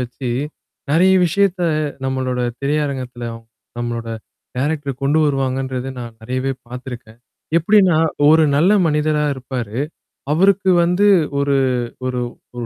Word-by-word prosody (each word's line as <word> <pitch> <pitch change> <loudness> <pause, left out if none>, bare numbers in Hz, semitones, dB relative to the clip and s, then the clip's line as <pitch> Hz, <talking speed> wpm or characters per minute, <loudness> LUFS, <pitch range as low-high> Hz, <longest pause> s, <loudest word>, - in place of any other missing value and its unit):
வச்சு 125 0 -4 0.6
நெறைய 180 +5 +4
விஷயத்த 190 +1 +1 0.4
நம்மளோட 130 -1 -1 0.2
திரையரங்கத்தில 135 -4 -2
அவங்க 115 0 -12 0.3
நம்மளோட 120 -1 -3 0.5
டைரக்டர் 140 -1 -2
கொண்டு 145 +3 +2
வருவாங்கன்றத 135 -2 -1
நான் 120 -2 -8
நறையவே 130 +3 -2
பார்த்துருக்கேன். 120 -2 -9 0.4
எப்படின்னா, 185 -1 +4 0.3
ஒரு 160 +1 +6
நல்ல 180 +7 +4
மனிதரா 150 0 +1
இருப்பாரு. 125 -3 -5 0.5
அவருக்கு 190 +4 +3
வந்து 180 +4 +3 0.3
ஒரு 140 0 +1 0.5
ஒரு 125 -1 -1 0.3
ஒரு 120 -1 -4
135 Hz, 110 wpm, -19 LUFS, 125-155 Hz, 0.6 s, ஒரு